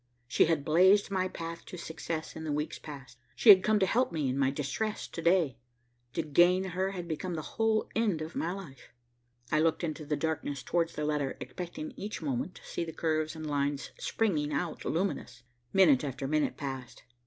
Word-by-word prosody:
She -, -, +4 dB
had 160 Hz, -4 st, 0 dB
blazed 190 Hz, +6 st, +5 dB
my 185 Hz, -1 st, +1 dB
path 165 Hz, -2 st, -6 dB
to 180 Hz, -, -8 dB
success 160 Hz, -1 st, -5 dB
in 160 Hz, -, -6 dB
the 155 Hz, -, -2 dB
weeks 150 Hz, +1 st, -2 dB
past. 140 Hz, -4 st, -10 dB, 0.2 s
She 230 Hz, -, +4 dB
had 190 Hz, -2 st, +11 dB
come 215 Hz, 0 st, +3 dB
to 195 Hz, -, +3 dB
help 240 Hz, +4 st, +2 dB
me 155 Hz, -4 st, -1 dB
in 130 Hz, -, -1 dB
my 135 Hz, -1 st, +3 dB
distress 150 Hz, +10 st, -2 dB
to 165 Hz, -, -6 dB
day. 170 Hz, -8 st, +3 dB, 0.5 s
To 165 Hz, -, -1 dB
gain 175 Hz, +5 st, +4 dB
her 190 Hz, +1 st, -1 dB
had 180 Hz, -3 st, -5 dB
become 170 Hz, +2 st, -3 dB
the 155 Hz, -, -4 dB
whole 220 Hz, +6 st, +1 dB
end 210 Hz, -7 st, +1 dB
of 155 Hz, +1 st, -6 dB
my 170 Hz, -, -1 dB
life. 170 Hz, -9 st, -9 dB, 0.6 s
I 155 Hz, -, +3 dB
looked 165 Hz, +2 st, +2 dB
into 155 Hz, -1 st, -3 dB
the 150 Hz, 0 st, -1 dB
darkness 145 Hz, -4 st, -2 dB
towards 170 Hz, -1 st, 0 dB
the 150 Hz, -, -2 dB
letter, 150 Hz, -3 st, -1 dB
expecting 265 Hz, -, -6 dB
each 205 Hz, +2 st, -5 dB
moment 145 Hz, +3 st, -2 dB
to -, -, -14 dB
see -, -, -3 dB
the 165 Hz, -, -5 dB
curves 155 Hz, -1 st, -1 dB
and 160 Hz, 0 st, -6 dB
lines 145 Hz, -1 st, -1 dB
springing 155 Hz, -10 st, 0 dB
out 155 Hz, +3 st, -2 dB
luminous. 160 Hz, -9 st, -2 dB, 0.3 s
Minute 160 Hz, -9 st, +5 dB
after 135 Hz, -1 st, -3 dB
minute 155 Hz, +1 st, +1 dB
passed. 135 Hz, -4 st, -6 dB
160 Hz, 200 wpm, -30 LUFS, 145-185 Hz, 0.6 s, had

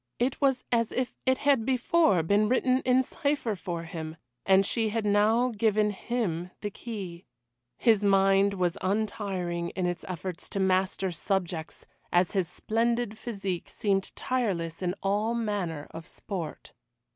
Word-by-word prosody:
It 255 Hz, +4 st, 0 dB
was 265 Hz, -2 st, +2 dB
as 230 Hz, -2 st, +2 dB
if 255 Hz, 0 st, -2 dB
it 260 Hz, 0 st, +4 dB
had 280 Hz, -5 st, +3 dB
before 255 Hz, -, +3 dB
been 205 Hz, +5 st, +3 dB
written 255 Hz, 0 st, +3 dB
in 255 Hz, +1 st, +4 dB
cypher 280 Hz, -5 st, -1 dB
for 175 Hz, -2 st, -4 dB
him, 160 Hz, -1 st, -6 dB, 0.3 s
and 195 Hz, 0 st, +6 dB
she 225 Hz, +1 st, +1 dB
had 220 Hz, 0 st, -1 dB
now 215 Hz, +4 st, +3 dB
given 215 Hz, -1 st, +2 dB
him 190 Hz, -6 st, -2 dB
the 205 Hz, -, -3 dB
key. 190 Hz, -6 st, -7 dB, 0.5 s
His 220 Hz, -4 st, +3 dB
mind 195 Hz, 0 st, +4 dB
was 180 Hz, -2 st, 0 dB
untiring 190 Hz, -4 st, -1 dB
in 185 Hz, -, 0 dB
its 175 Hz, -1 st, -2 dB
efforts 185 Hz, 0 st, -5 dB
to 200 Hz, -, -3 dB
master 190 Hz, 0 st, +1 dB
subjects, 175 Hz, -2 st, -3 dB, 0.3 s
as 175 Hz, 0 st, +3 dB
his 190 Hz, -4 st, 0 dB
splendid 230 Hz, +4 st, 0 dB
physique 195 Hz, -6 st, -4 dB
seemed 195 Hz, -2 st, -1 dB
tireless 190 Hz, -11 st, -1 dB
in 180 Hz, 0 st, -1 dB
all 210 Hz, +4 st, +1 dB
manner 200 Hz, -10 st, -2 dB
of 165 Hz, +1 st, -9 dB
sport. 175 Hz, -6 st, -6 dB
200 Hz, 145 wpm, -28 LUFS, 180-230 Hz, 0.5 s, and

